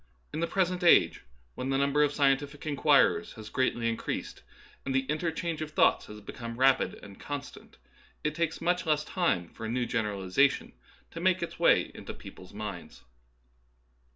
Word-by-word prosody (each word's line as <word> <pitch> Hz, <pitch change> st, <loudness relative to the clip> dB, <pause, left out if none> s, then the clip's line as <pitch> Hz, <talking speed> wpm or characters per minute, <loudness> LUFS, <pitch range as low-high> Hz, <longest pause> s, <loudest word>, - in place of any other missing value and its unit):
In -, -, -3 dB
the 170 Hz, -, 0 dB
present 180 Hz, 0 st, 0 dB
age, 170 Hz, -, +5 dB, 0.3 s
when 130 Hz, -, -4 dB
the 135 Hz, -, +1 dB
number 140 Hz, +1 st, +2 dB
of 150 Hz, -, +4 dB
sci 145 Hz, 0 st, -2 dB
entific 140 Hz, +2 st, +1 dB
inquirers 150 Hz, +7 st, +3 dB
has 110 Hz, -2 st, -10 dB
greatly 125 Hz, -3 st, 0 dB
increased 115 Hz, 0 st, -4 dB, 0.4 s
and 135 Hz, -1 st, -2 dB
the 135 Hz, -, +4 dB
in 150 Hz, +3 st, -2 dB
terchange 165 Hz, -1 st, -2 dB
of 155 Hz, -, -3 dB
thoughts 155 Hz, -, +3 dB
has 105 Hz, 0 st, -9 dB
become 115 Hz, +2 st, -7 dB
rapid 135 Hz, +1 st, +3 dB
and 100 Hz, -1 st, -12 dB
con 145 Hz, -1 st, -4 dB
stant, -, -, -14 dB, 0.5 s
it 150 Hz, -, 0 dB
takes 165 Hz, 0 st, -1 dB
much 175 Hz, -1 st, 0 dB
less 150 Hz, -1 st, +2 dB
time 100 Hz, -, 0 dB
for -, -, -11 dB
a 110 Hz, -, -3 dB
new 120 Hz, +1 st, 0 dB
gener 105 Hz, -3 st, -1 dB
alization 95 Hz, +9 st, +2 dB, 0.4 s
to -, -, -7 dB
make -, -, +2 dB
its -, -, -6 dB
way -, -, +4 dB
into -, -, -8 dB
people's 90 Hz, -, -12 dB
minds. 105 Hz, -4 st, -7 dB
140 Hz, 180 wpm, -29 LUFS, 115-155 Hz, 0.5 s, age